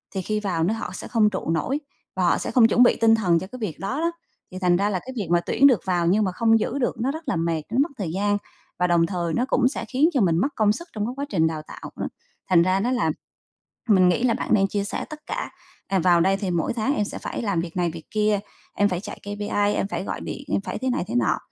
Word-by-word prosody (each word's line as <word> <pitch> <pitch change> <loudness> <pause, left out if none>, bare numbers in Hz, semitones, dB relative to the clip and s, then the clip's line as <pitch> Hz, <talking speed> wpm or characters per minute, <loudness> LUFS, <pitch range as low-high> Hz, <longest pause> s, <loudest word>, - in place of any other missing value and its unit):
thì 190 - -1
khi 215 +3 -1
vào 185 -6 -1
nó 195 +7 +1
họ 225 -5 -5
sẽ - - -7
không 215 -3 +3
trụ 190 -4 -4
nổi 260 - 0 0.4
và - - 0
họ - - +3
sẽ - - -4
không 235 -4 +6
chuẩn 240 +3 +5
bị 245 - +5
tinh 225 0 +6
thần 180 -6 +2
cho 190 - -7
cái 255 +4 -10
việc 205 -9 -4
đó 255 +10 -3
đó, 335 +1 +1 0.4
thì 185 - -6
thành 180 -2 +3
ra 200 +2 +1
là 185 -3 -1
cái 260 +6 -9
việc 200 - -2
mà 175 - +5
tuyển 275 +9 +4
được 240 -9 +3
vào 175 -2 +1
nhưng 205 +5 +3
mà 185 - 0
không 225 +3 +3
giữ 260 +5 -2
được 245 - 0
nó 265 +3 +1
rất 315 +2 -7
là - - 0
mệt, 165 -1 -1
nó 235 - -1
mất 310 - +1
thời 180 -6 -3
gian 205 +2 +1 0.4
và 180 - +3
đồng 170 -1 +3
thời 170 -3 -2
nó 245 - +1
cũng 255 - +3
sẽ 270 - -3
khiến 280 +5 +3
cho 265 - +2
mình 170 -4 +3
mất 210 - +2
công 215 -2 +3
sức 340 +7 -8
trong 210 -1 -2
cái 245 - -3
quá 280 - -2
trình 160 -5 +2
đào 155 -1 -3
tạo, - - -9
đó. - - -3 0.4
Thành 170 -2 +5
ra 185 +2 +2
nó 240 +5 0
là 250 - +1 0.8
mình 185 -4 +5
nghĩ 180 +7 +1
là 235 - +3
bạn - - -4
nên 195 -2 +4
chia 200 0 -1
sẻ 205 - -4
tất 305 - -8
cả, - - -4 0.4
ờ, 195 -1 +1
vào 175 0 +4
đây 190 +3 +3
thì 195 -2 -3
mỗi 170 +3 0
tháng 235 +5 0
em 210 - +1
sẽ - - -6
phải - - -5
làm 200 -6 0
việc 170 0 -6
này 175 -1 +1
việc 160 0 -9
kia, 210 -1 +1 0.3
em 205 - +3
phải 180 -3 -2
chạy - - -8
KPI, 205 0 -1
em 195 - -1
phải 195 - -3
gọi - - -4
điện 280 - -6
em - - +2
phải 200 - -5
thế 260 +3 -1
này 245 - -1
thế - - -4
nọ, 120 -3 +2
205 Hz, 295 wpm, -24 LUFS, 180-230 Hz, 0.8 s, không